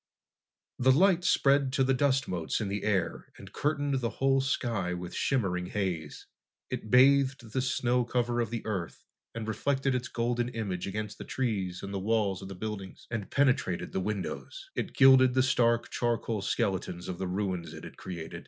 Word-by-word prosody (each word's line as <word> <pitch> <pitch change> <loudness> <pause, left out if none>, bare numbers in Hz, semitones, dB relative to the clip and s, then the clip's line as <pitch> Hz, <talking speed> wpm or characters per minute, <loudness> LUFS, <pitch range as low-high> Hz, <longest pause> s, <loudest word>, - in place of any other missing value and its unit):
The 130 +1 +5
light 180 +5 +4
spread 140 -5 +3
to 135 - +3
the 135 +1 +3
dust 135 -1 +2
motes 85 -3 -2
in 105 -3 -2
the 100 +1 -2
air 95 -5 -1
and - - -12
curtained 145 -2 0
the 115 - 0
whole 135 0 +3
sky 115 -9 -1
with 90 0 -7
shimmering 95 -9 0
haze. 90 -7 -3 0.5
It 110 - -4
bathed 130 -2 +4
the 130 - +1
snow 125 -1 +1
cover 120 0 0
of 115 - -2
the 115 0 -5
Earth, 95 -6 -4 0.3
and 115 -1 -4
reflected 135 +5 0
its 125 0 -2
golden 120 -1 -1
image 100 -7 -3
against 105 +2 -5
the - - -5
trees 100 -8 -2
and 100 0 -5
the 100 - -1
walls 100 -2 0
of 95 - -7
the 95 - -7
buildings, 100 -1 -6
and 110 -4 -3
penetrated 130 -10 +1
the - - -1
windows. 105 - -5
It - - -4
gilded 130 -1 +7
the 130 - +4
stark, 120 -2 +2
charcoal 115 -3 -1
skeletons 95 -3 -2
of 90 -2 -5
the 95 - -2
ruins 90 -3 -2
it - - -10
had - - -10
created. 85 -3 -7
115 Hz, 180 wpm, -29 LUFS, 95-130 Hz, 0.5 s, gilded